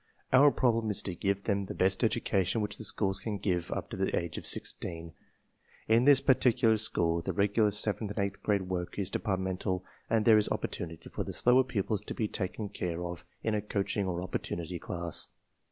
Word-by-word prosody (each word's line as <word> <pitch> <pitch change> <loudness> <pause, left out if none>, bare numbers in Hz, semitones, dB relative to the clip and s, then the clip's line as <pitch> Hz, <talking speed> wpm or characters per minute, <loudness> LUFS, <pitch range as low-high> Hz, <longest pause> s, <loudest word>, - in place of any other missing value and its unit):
Our 140 +3 +8
problem 115 -4 +1
is 105 - 0
to 95 - -3
give 100 +2 -1
them 100 -2 0
the - - -7
best 95 +5 +1
education 110 -3 +1
which 105 0 -3
the - - -5
schools 95 -2 +1
can 105 +1 -3
give 90 -4 -1
up - - -4
to - - -5
the - - 0
age 85 -2 -6
of - - -3
sixteen. 85 -2 -4 0.7
In 115 +3 +4
this 140 -1 +7
particular 125 -3 +3
school 85 -6 +2
the - - -3
regular 105 +2 +2
seventh 105 +1 +2
and 105 - -5
eighth 100 0 -2
grade 100 -2 +1
work 90 -1 -4
is 100 -1 -2
departmental 95 -2 -2 0.2
and 110 -2 +2
there 110 -2 +7
is 105 - 0
opportunity 80 -1 -4
for - - -3
the - - -6
slower 125 +2 +5
pupils 105 -4 -2
to - - -5
be 110 - -1
taken 100 +1 -3
care 90 -3 -4
of 85 0 -6 0.2
in 110 - 0
a 105 - 0
coaching 100 -1 -2
or 90 -1 -2
opportunity 85 -1 -4
class. 85 -1 -1
100 Hz, 200 wpm, -30 LUFS, 90-110 Hz, 0.7 s, Our